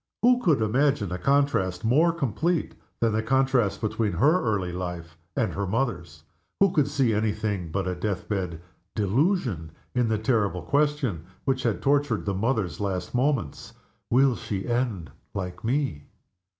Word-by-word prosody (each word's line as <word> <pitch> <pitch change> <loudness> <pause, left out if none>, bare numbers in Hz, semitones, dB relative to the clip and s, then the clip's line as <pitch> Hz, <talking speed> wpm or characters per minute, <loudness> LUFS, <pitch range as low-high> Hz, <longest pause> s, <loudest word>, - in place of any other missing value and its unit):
Who 250 +1 +5
could 150 - +3
imagine 125 - +1
a 90 - -3
contrast 140 -8 +1
more 155 +9 +4
complete 165 - -1 0.3
than 115 -2 +2
the 110 - +1
contrast 130 -2 +2
between 110 -1 0
her 150 - +3
early 100 -6 0
life 90 -3 -5 0.2
and 120 -5 0
her 100 0 -2
mother's? 90 - -2 0.4
Who 195 -2 +5
could 150 -6 +2
see 135 -5 +1
any 105 0 +1
thing 105 -5 -3
but 95 +2 -1
a 90 - 0
death 95 +1 -3
bed 90 -5 -3 0.3
delusion 110 - 0 0.2
in 125 -1 +2
the 110 -1 +1
terrible 105 -6 0
question 140 - 0 0.2
which 135 -1 +1
had 115 -5 -1
tortured 140 -5 +2
the 100 - 0
mother's 100 - -1
last 95 -3 -3
moments: 125 - -1 0.4
"Will 130 +1 +4
she 95 -4 -4
end 120 -8 -1 0.2
like 90 -2 -5
Me?" 125 - -1
110 Hz, 155 wpm, -26 LUFS, 95-135 Hz, 0.4 s, Who